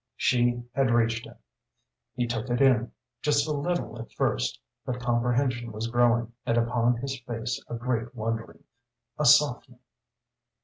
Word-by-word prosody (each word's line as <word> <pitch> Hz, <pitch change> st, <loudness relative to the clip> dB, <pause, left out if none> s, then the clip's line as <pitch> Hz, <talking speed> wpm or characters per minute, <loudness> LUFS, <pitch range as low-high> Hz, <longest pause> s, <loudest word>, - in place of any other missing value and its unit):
She 120 Hz, -1 st, +2 dB
had 135 Hz, -2 st, +2 dB
reached 115 Hz, -1 st, +1 dB
him. -, -, -14 dB, 0.8 s
He 120 Hz, -, 0 dB
took 120 Hz, +1 st, -3 dB
it 120 Hz, 0 st, 0 dB
in, 125 Hz, -4 st, +4 dB, 0.3 s
just 145 Hz, 0 st, +2 dB
a -, -, -1 dB
little 150 Hz, -5 st, -2 dB
at 115 Hz, -, -11 dB
first, -, -, -1 dB, 0.2 s
but 125 Hz, -1 st, -3 dB
comprehension 120 Hz, 0 st, 0 dB
was 110 Hz, +1 st, -4 dB
growing, 120 Hz, -1 st, +2 dB
and 115 Hz, -, 0 dB
upon 120 Hz, 0 st, +2 dB
his 135 Hz, +2 st, -4 dB
face 115 Hz, -2 st, -4 dB
a -, -, -5 dB
great 120 Hz, 0 st, -2 dB
wondering, 115 Hz, 0 st, -4 dB, 0.6 s
a -, -, +1 dB
softening. -, -, +4 dB
120 Hz, 145 wpm, -27 LUFS, 115-125 Hz, 0.8 s, in